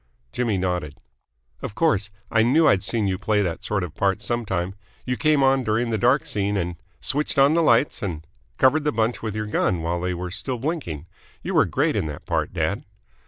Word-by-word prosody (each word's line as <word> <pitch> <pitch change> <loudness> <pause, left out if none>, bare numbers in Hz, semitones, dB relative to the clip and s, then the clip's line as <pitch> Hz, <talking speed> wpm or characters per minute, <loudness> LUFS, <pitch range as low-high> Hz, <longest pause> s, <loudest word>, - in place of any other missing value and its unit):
Jimmy 115 -5 0
nodded. 90 -5 -2 0.7
"Of 105 - -6
course. 110 - +2 0.2
I 110 - +4
knew 145 +8 +4
I'd 95 - +4
seen 110 +1 +1
you 95 -1 -1
play 105 -1 +1
that 85 -3 -3
sort 100 -3 -1
of 85 - -6
part 100 0 +1
some 120 0 -2
time. 95 0 -1 0.3
You 125 - -1
came 150 0 +3
on 135 0 +3
during 115 +1 0
the 110 - +1
dark 125 +4 +3
scene 100 0 -1
and 90 -2 -2
" 95 - -38
" - - -41
switched 145 +2 -1
on 140 +2 +6
the 170 - +3
lights 150 -2 +3
and 80 -6 -4
" - - -37
" - - -39
covered 145 +4 +4
the 150 - +1
bunch 115 +1 0
with 110 -2 -4
your 110 0 -2
gun 95 -5 0
while 85 +1 -1
they 90 0 -1
were 90 +1 -5
still 125 +6 -3
blinking! 120 - -3 0.4
You - - -3
were - - +5
great - - 0
in - - 0
that 75 - -7
part, - - -1
dad." - - -1
105 Hz, 230 wpm, -23 LUFS, 90-130 Hz, 0.7 s, on